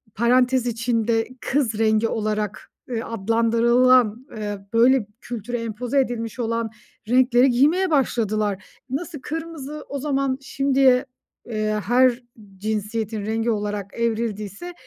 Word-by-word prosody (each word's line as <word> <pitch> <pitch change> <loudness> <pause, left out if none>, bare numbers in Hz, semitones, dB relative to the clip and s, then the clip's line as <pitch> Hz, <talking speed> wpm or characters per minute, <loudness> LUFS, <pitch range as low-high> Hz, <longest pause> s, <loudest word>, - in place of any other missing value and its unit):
parantez 250 +2 +3
içinde 230 -1 0
kız 245 -7 0
rengi 220 0 +3
olarak, 215 -1 -3 0.2
eee, 235 -2 -2
adlandırılan, 230 +2 +3
eee, 205 -1 -4
böyle, 240 -1 +4
kültüre 240 0 -4
empoze 235 +4 -1
edilmiş 240 -2 -2
olan 230 -1 -1 0.4
renkleri 250 +1 +4
giymeye 315 +9 +3
başladılar. 215 -8 0 0.2
Nasıl 295 +3 -4
kırmızı 305 -1 -6
o 280 - -4
zaman 275 -2 0
şimdiye, 270 -1 +3 0.4
eee, 215 -1 -1
her 250 0 +3 0.3
cinsiyetin 215 +1 -3
rengi 225 +2 0
olarak 205 -2 -3
evrildiyse 225 - -3
235 Hz, 110 wpm, -23 LUFS, 215-260 Hz, 0.4 s, böyle